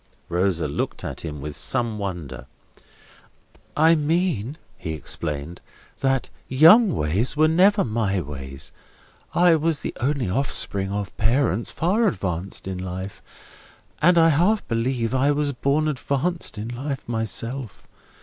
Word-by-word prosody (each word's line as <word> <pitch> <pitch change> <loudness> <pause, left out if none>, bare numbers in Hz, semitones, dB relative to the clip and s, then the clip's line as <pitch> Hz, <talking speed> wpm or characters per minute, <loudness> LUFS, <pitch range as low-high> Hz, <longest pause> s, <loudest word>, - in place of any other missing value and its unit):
Rosa 90 -2 +1
looked 70 - -3
at - - -5
him 75 -3 -6
with 75 +1 -6
some 120 -4 0
wonder. 75 -10 -5 1.3
"I 160 +2 +6
mean," 155 - 0 0.2
he 80 - -4
explained, 75 +1 -4 0.4
"that 135 -1 0 0.2
young 170 - +6
ways 95 - 0
were 155 +1 +5
never 190 +6 +4
my 105 -4 0
ways. 70 -3 -7 0.6
I 175 -1 +6
was 160 -1 0
the - - -5
only 135 -2 0
offspring 100 -3 -2
of 100 -1 -4
parents 115 0 +1
far 205 +7 +1
advanced 95 - -3
in 95 -1 -4
life, 95 +2 -6 0.8
and 175 +3 +5
I 165 0 +6
half 180 +8 +2
believe 115 +1 -1
I 130 +2 +3
was 145 -1 +1
born 140 +5 +1
advanced 150 +1 -2
in 105 +2 -5
life 135 +3 -5
myself. 115 +1 -3
120 Hz, 130 wpm, -23 LUFS, 95-155 Hz, 1.3 s, I